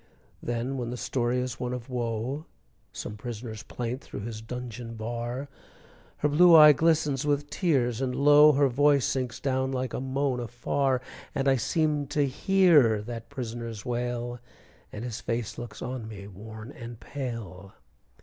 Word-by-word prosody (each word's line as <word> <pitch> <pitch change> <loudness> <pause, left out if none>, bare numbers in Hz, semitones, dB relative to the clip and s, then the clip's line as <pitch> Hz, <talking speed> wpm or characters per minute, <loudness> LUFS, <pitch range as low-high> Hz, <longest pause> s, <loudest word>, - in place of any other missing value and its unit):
Then 120 +3 -2
when 120 -1 -3
the 125 - -4
story 125 0 0
is 125 -1 -3
one 125 0 -2
of 125 0 -7
woe, 125 +3 -3 0.4
Some 105 - -6
prisoner's 110 -1 -6
plaint 120 +3 -4
through - - -8
his 110 0 -6
dungeon 120 0 -6
bar, 120 +4 -4 0.7
Her 150 - +1
blue 170 +4 +7
eye 150 -1 +10
glistens 150 -2 +2
with 145 0 0
tears, 130 - +1
and 125 -1 -1
low, 145 +1 +7
Her 140 0 +4
voice 140 +1 +3
sinks 130 -3 -2
down 130 -1 0
like 130 -1 -2
a - - -2
moan 135 -1 -1
afar; 125 +3 0 0.3
And 135 0 0
I 135 -1 +4
seem 150 +3 0
to 145 +1 +1
hear 145 - +4
that 115 0 -7
prisoner's 115 -5 -6
wail, 120 0 -2 0.5
And 105 - -6
his 120 -3 -5
face 115 -2 -3
looks 120 -2 -7
on 125 -3 -4
me 100 -3 -8
worn 110 +4 -10
and 120 -4 -9
pale. 115 -8 -6
125 Hz, 160 wpm, -28 LUFS, 115-140 Hz, 0.7 s, eye